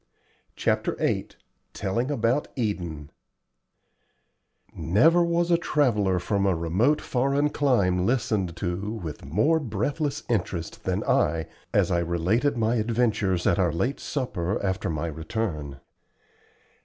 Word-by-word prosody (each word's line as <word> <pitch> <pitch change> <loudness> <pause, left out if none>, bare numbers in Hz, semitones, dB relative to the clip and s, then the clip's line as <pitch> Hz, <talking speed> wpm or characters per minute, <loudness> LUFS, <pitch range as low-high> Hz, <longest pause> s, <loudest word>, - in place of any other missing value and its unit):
CHAPTER - - 0
VIII - - 0 0.5
TELLING 115 +6 -1
ABOUT 125 0 +1
EDEN 85 - -3 1.6
Never 110 - +4
was 170 0 +1
a 170 - +4
traveller 105 - +2
from 100 +3 0
a 95 - +2
remote 95 - +2
foreign 140 +3 +1
clime 100 -11 +2
listened 110 -8 0
to 95 +4 -3
with 85 -9 -6
more 110 - +2
breathless 145 +5 -2
interest 90 -7 -2
than - - 0
I 80 +1 +1 0.3
as - - +2
I 85 - +2
related 90 - +1
my 115 +1 +1
adventures 110 -5 +1
at 85 - +3
our 90 -3 +3
late 120 - -1
supper 100 - -2
after 95 0 -1
my 80 0 -2
return. 80 -3 -4
105 Hz, 120 wpm, -26 LUFS, 85-130 Hz, 1.6 s, Never